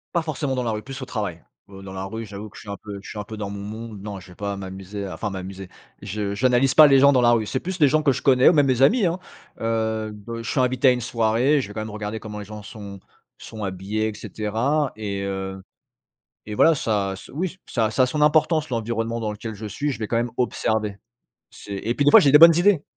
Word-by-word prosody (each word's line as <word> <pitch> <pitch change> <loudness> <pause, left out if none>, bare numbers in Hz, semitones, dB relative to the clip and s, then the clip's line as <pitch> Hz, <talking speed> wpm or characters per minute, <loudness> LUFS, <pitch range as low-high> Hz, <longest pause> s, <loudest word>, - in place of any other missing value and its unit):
Pas 170 - +3
forcément 145 -4 -3
dans 125 - -1
la 115 - -1
rue, 105 0 -3
plus 135 +2 -8
au 130 - -4
travail. 100 -9 -4 0.3
Heu, 95 -1 -11
dans 95 - -9
la 95 0 -5
rue, 110 +3 -6
j'avoue 105 +1 -8
que 105 - -17
je - - -10
suis 105 - -12
un 100 - -4
peu 100 -2 -7
je - - -10
suis 105 - -6
un 105 - -5
peu 110 - -8
dans 105 -2 -5
mon 100 - -6
monde. 110 +1 -7
Non 100 -1 -7
je - - -15
vais - - -14
pas 100 +1 -3
m'amuser 95 +1 -7
à 95 - -6
enfin 105 - -3
«m'amuser» 95 0 -7 0.3
je 100 0 -3
j'analyse 125 +4 +2
pas 155 -1 +9
les 135 -1 +6
gens 140 +1 +7
dans 130 - +3
la 120 0 +5
rue. 115 -2 +1
C'est 130 - -2
plus 185 +4 -5
des 145 -3 +5
gens 155 +3 +2
que 145 -3 +3
je - - -5
connais, 130 -1 +5
ou - - +7
même 145 -3 +4
mes 130 -1 +1
amis, 210 - +5
hein, 170 +2 0 0.4
heu, 110 -1 -1
b 110 +3 -8
je 115 - -6
suis 130 - +1
invité 130 +1 +2
à - - +8
une 125 0 -1
soirée, 120 +5 +2
je 130 - -3
vais 105 - -10
quand 110 - -4
même 110 - -5
regarder 105 +1 -5
comment 105 -1 -7
les 105 - -7
gens 105 0 -9
sont 100 -3 -10 0.4
sont 110 -2 -7
habillés, 100 +3 -2
et 110 - -4
cetera. 115 +8 -1
Et 100 -2 -4
heu, 95 -1 -4 0.8
et 105 - -6
voilà, 165 +9 +5
ça 100 -7 -1
ce - - -13
oui, 180 +5 -3
ça 110 -3 0
ça 130 - +2
a 130 - +4
son 150 +4 -3
importance, 155 +1 +3
l'environnement 115 -1 -2
dans 110 -2 -2
lequel 110 +1 -7
je 105 +2 -9
suis, 140 +8 -2
je 120 - -7
vais 110 -2 -4
quand 115 - 0
même 120 0 -1
observer. 110 -4 -1 0.5
C'est 100 -1 -8
et 115 +4 -2
puis 145 - 0
des 145 - +6
fois - - +10
j'ai 140 - +4
des 150 - +9
bonnes 165 +1 +9
idées. 180 -3 +4
110 Hz, 275 wpm, -23 LUFS, 100-130 Hz, 0.8 s, fois